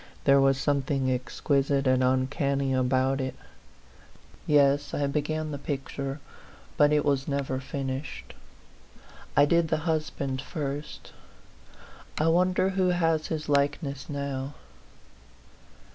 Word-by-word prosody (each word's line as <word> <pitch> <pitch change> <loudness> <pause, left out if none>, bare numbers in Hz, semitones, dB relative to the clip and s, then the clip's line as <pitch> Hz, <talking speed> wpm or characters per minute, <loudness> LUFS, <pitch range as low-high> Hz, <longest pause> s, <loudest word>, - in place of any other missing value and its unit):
There 140 0 +5
was 135 -1 +4
something 135 -2 0
exquisite 135 +2 0
and 130 0 +3
uncanny 135 +1 +1
about 130 +1 +1
it. 130 0 -3 1.1
Yes; 145 -1 +3
I 145 - 0
began 155 +2 -2
the 145 - -5
picture, 140 0 -4 0.6
but 145 0 +4
it 150 -1 +2
was 140 -2 +1
never 140 -2 -1
finished. 135 +1 -5 1.0
I 145 - +7
did 170 +2 +3
the 155 0 -1
husband 150 -5 -2
first; 145 -1 -6 1.0
I 155 +1 +2
wonder 185 +2 +3
who 190 -1 +1
has 165 -3 +1
his 155 -1 -4
likeness 140 -1 0
now? 140 -1 -4
140 Hz, 115 wpm, -27 LUFS, 135-150 Hz, 1.1 s, I